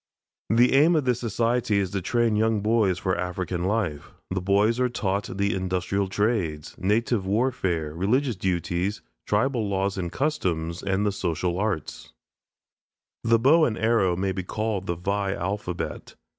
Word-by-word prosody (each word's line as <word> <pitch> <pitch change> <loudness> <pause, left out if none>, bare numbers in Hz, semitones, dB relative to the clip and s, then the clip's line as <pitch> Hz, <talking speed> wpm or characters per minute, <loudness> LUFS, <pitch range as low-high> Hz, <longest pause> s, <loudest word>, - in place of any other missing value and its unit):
The 120 +4 +4
aim 155 +5 +5
of 150 -4 +1
this 125 -2 +1
society 115 -1 0
is 95 -3 0
to 100 - -2
train 115 +3 +1
young 110 0 +2
boys 105 -4 +2
for 95 0 -1
African 90 0 -3
life. 95 -8 -1 0.2
The 95 -1 -1
boys 100 +5 +2
are 125 0 +2
taught 100 -4 -2
the 100 0 +1
industrial 95 +1 -1
trades, 95 -7 -1
native 105 +1 +1
warfare, 95 -8 0
religious 120 - +1
duties, 90 +2 -2 0.2
tribal 110 0 +1
laws 95 0 -1
and 85 -2 -3
customs, 85 - -1
and 95 +1 0
the 105 - +2
social 90 -1 -2
arts. 100 -8 -3 1.1
The 115 0 +4
bow 145 +8 +5
and 115 -7 +1
arrow 110 -5 +2
may 95 +2 -1
be 95 - -3
called 105 0 -3
the 85 - -1
Vai 100 +3 -1
alphabet. 90 -1 -4
100 Hz, 155 wpm, -25 LUFS, 90-115 Hz, 1.1 s, aim